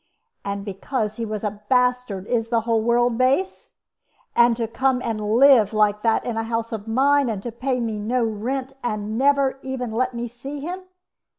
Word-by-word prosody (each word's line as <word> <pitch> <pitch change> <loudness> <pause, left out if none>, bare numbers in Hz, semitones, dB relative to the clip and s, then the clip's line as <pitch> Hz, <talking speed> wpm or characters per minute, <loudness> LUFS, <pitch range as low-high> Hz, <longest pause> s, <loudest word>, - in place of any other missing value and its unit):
And 200 0 -4
because 210 +2 -3
he 230 - -2
was 215 -1 -4
a 210 0 -4
bastard, 250 -6 +1
is 230 0 -1
the 230 -1 +2
whole 225 0 +1
world 240 +1 +2
base? 275 +9 0 0.6
And 235 -1 +5
to 230 -2 -1
come 255 +3 +1
and 220 -2 -2
live 225 0 +5
like 210 -1 +2
that 225 0 +1
in 235 -2 -3
a 225 - 0
house 230 0 -3
of 220 -1 -5
mine, 275 +3 +3
and 210 0 -4
pay 255 -1 0
me 225 -3 -2
no 235 +4 0
rent, 250 +5 -3
and 215 -2 -3
never 275 +1 +2
even 260 -3 -4
let 255 +2 -1
me 235 0 -3
see 270 +5 -8
him! 360 +6 -6
235 Hz, 185 wpm, -23 LUFS, 215-255 Hz, 0.6 s, And